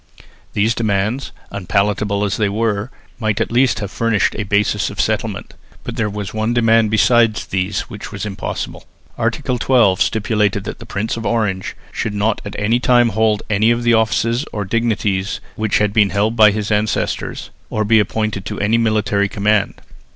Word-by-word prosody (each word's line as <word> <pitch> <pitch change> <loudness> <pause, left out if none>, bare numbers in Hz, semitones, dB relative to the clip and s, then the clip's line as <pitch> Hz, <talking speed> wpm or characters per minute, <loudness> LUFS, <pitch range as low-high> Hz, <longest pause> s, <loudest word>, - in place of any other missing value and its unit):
These 110 +3 +2
demands, 110 +3 -1 0.2
unpalatable 100 +1 0
as 100 -1 -1
they 105 -2 +1
were, 110 +1 -1 0.3
might 110 -3 0
at - - -1
least 125 +2 +3
have 100 -1 -4
furnished 115 -3 +1
a - - -3
basis 105 0 +1
of - - -9
settlement, - - -2 0.3
but 125 - -6
there 110 -3 0
was 105 -1 -5
one 110 +2 -1
demand 115 -2 +4
besides 115 0 +3
these 95 +1 -1
which - - -9
was - - -5
impossible. 95 -2 -5 0.3
Article 125 -1 -1
12 115 -8 +3
stipulated 105 -2 +1
that - - -6
the - - -11
Prince 105 +3 -3
of 115 - -5
Orange 105 -5 -1 0.2
should 105 -2 -3
not 105 +1 0
at 105 0 -7
any 110 +4 +1
time 120 -1 +4
hold 110 -1 +1
any 110 +1 +2
of 120 0 +1
the 120 0 +3
offices 115 +2 +1
or 105 -2 -3
dignities 105 -3 -1 0.2
which 110 -1 +1
had 105 -1 +1
been 105 -2 +4
held 105 +3 0
by 110 -2 +7
his 105 +1 -2
ancestors, 105 +1 -1 0.2
or 110 0 -1
be 110 +1 +5
appointed 110 -1 -1
to 105 - -5
any 110 +3 +2
military 105 -3 +1
command. 105 0 +1
110 Hz, 175 wpm, -18 LUFS, 100-115 Hz, 0.3 s, by